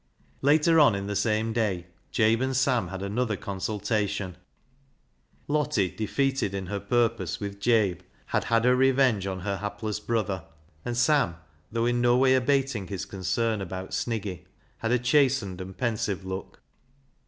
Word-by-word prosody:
Later 155 +3 +4
on, 140 -9 +6
in 100 0 -3
the 105 0 -3
same 110 +1 +1
day, 100 -7 0 0.3
Jabe 115 +1 +3
and 130 -1 0
Sam 125 -6 +2
had 95 +1 -6
another 105 +1 -1
consultation. 100 -1 -2 1.1
Lottie, 145 -11 +1
defeated 130 -1 -1
in 95 -1 -3
her 100 +2 -3
purpose 115 -7 0
with 100 -1 -5
Jabe, 100 -5 +2 0.3
had - - -1
had 115 0 +2
her 125 0 +5
revenge 130 -6 +3
on 95 -1 -4
her 100 +1 -2
hapless 105 +1 -4
brother, 105 -5 -1 0.4
and 120 -1 -3
Sam, 125 - +3 0.4
though 115 +1 0
in 120 0 +1
no 120 0 +4
way 130 0 +5
abating 130 -5 +1
his 95 -3 -4
concern 100 +3 -1
about 95 0 -6
Sniggy, 100 -6 -3 0.3
had 115 - -1
a 125 - +4
chastened 125 -7 +2
and 95 0 -8
pensive 105 -5 -1
look. 95 0 -7
110 Hz, 155 wpm, -27 LUFS, 95-125 Hz, 1.1 s, on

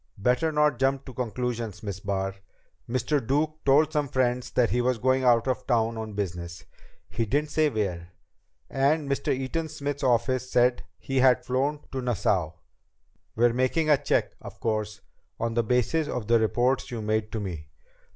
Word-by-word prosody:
"Better 125 +9 +1
not 150 -4 +2
jump 135 0 +1
to 130 - -9
conclusions, 120 -3 -3
Miss 100 -3 -4
Barr. 95 -1 -2 0.6
Mr. 130 +3 0
Duke 155 +5 -1
told 150 +3 +4
some 150 -2 +1
friends 125 -1 0
that 120 -2 +2
he 125 - +2
was 125 0 +1
going 130 +3 +2
out 120 -1 +4
of 130 - -2
town 115 -2 +1
on 110 -1 -5
business. 90 -3 -5 0.4
He 115 - -2
didn't 145 +6 0
say 155 -1 +3
where. 90 -7 -3 0.6
And 140 +2 +1
Mr. 140 0 -1
Eaton 135 +5 -2
Smith's 145 -2 -4
office 130 +1 +1
said 125 0 +3
that - - -11
he 135 - -4
had 130 -1 +4
flown 140 +4 0
to 130 - -3
Nassau. 100 -8 0 0.8
We're 120 +1 +3
making 130 +6 +1
a 145 - +6
check, - - +1
of - - -10
course, 110 -2 -2 0.4
on 115 0 -1
the 120 - +2
basis 125 +7 +1
of 125 -6 -3
the 115 0 +4
reports 120 +4 +1
you 115 -3 -5
made 110 0 -1
to 110 - -2
me. 85 -7 -6
125 Hz, 175 wpm, -26 LUFS, 110-135 Hz, 0.8 s, a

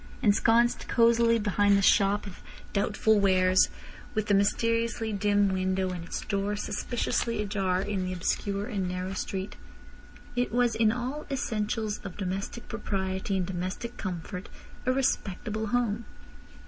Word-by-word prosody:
Ensconced 230 +2 +3
cosily 230 0 +4
behind 205 -1 +3
the - - +2
shop 200 +2 +4
of 195 -3 -9 0.3
doubtful 210 +1 +2
wares, 185 -1 +4 0.5
with 215 -1 +1
the 205 - +1
mysteriously 230 +2 +1
dim 205 0 +3
window, 190 0 0
and 175 -2 -5
its 170 - -5
door 200 0 -1
suspiciously 230 +1 -1
ajar 195 -3 0
in 200 -2 -2
the 185 - -3
obscure 200 +2 -1
and 200 -5 -2
narrow 185 +1 -3
street, 190 0 -4 0.8
it 245 -3 0
was 240 0 +2
in 220 -1 +3
all 255 +6 -4
essentials 220 -5 -2
of 195 -3 -9
domestic 195 +4 -4
propriety 195 -3 -2
and 185 - 0
domestic 185 +6 -4
comfort 180 0 -5 0.4
a - - +5
respectable 220 -4 -1
home. 235 -1 0
205 Hz, 135 wpm, -28 LUFS, 190-230 Hz, 0.8 s, a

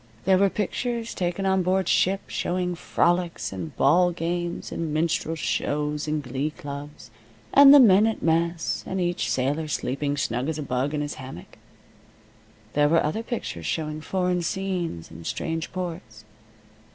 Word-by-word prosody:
There 190 -1 +4
were 200 0 +4
pictures 230 +4 -2
taken 180 +2 -2
on 190 0 +3
board 185 +1 +1
ship, 195 +2 +2
showing 180 0 -2
frolics, 175 - 0
and 90 -5 -6
ball 175 +6 +4
games, 175 +1 -3
and 165 -2 -3
minstrel 160 +1 0
shows 150 -1 -1
and 150 -1 -1
glee 135 +3 -2
clubs, 145 -3 -9 0.4
and 280 0 +9
the 290 - +10
men 210 -3 +6
at 225 - -3
mess, 165 -9 0
and 190 - -2
each 175 -1 -1
sailor 145 +5 0
sleeping 145 0 -2
snug 125 +1 -1
as 160 - -2
a 150 - -3
bug 135 +3 -1
in 150 - -1
his 145 0 -3
hammock. 130 -9 -10 1.2
There 145 0 +3
were 165 +1 +4
other 155 +9 -1
pictures 225 - -5
showing 155 -1 -2
foreign 180 +1 0
scenes 175 - -3
and 80 +1 -10
strange 160 -1 -3
ports. 165 - -6
165 Hz, 155 wpm, -25 LUFS, 145-185 Hz, 1.2 s, the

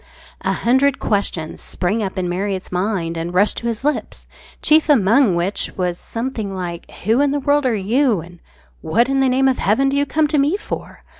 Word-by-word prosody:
A - - 0
hundred 265 +3 +2
questions 190 -6 -2
sprang 195 +5 -2
up 200 -1 -4
in 185 -1 -1
Marriott's 190 +1 -3
mind 180 -3 -1
and 170 +2 -4
rushed 200 +3 +3
to 235 - -3
his 230 +1 -3
lips, 295 +1 -2 0.4
chief 310 0 +4
among 230 -4 +4
which 175 +4 -1
was 180 -2 -1
something 230 -5 -4
like 175 -2 -6
"Who 225 +7 +3
in 285 - +3
the 290 +1 0
world 285 0 +2
are 235 - +1
you?" 225 +2 +1
and 175 +1 -11 0.4
"What 235 +4 +1
in 270 0 +1
the 265 -1 +3
name 265 +1 +3
of 260 - +1
heaven 265 +7 +2
do 275 - -1
you 285 0 +1
come 310 -1 +1
to 300 -1 +2
me 295 +8 +2
for?" 420 - -7
220 Hz, 205 wpm, -19 LUFS, 185-270 Hz, 0.4 s, chief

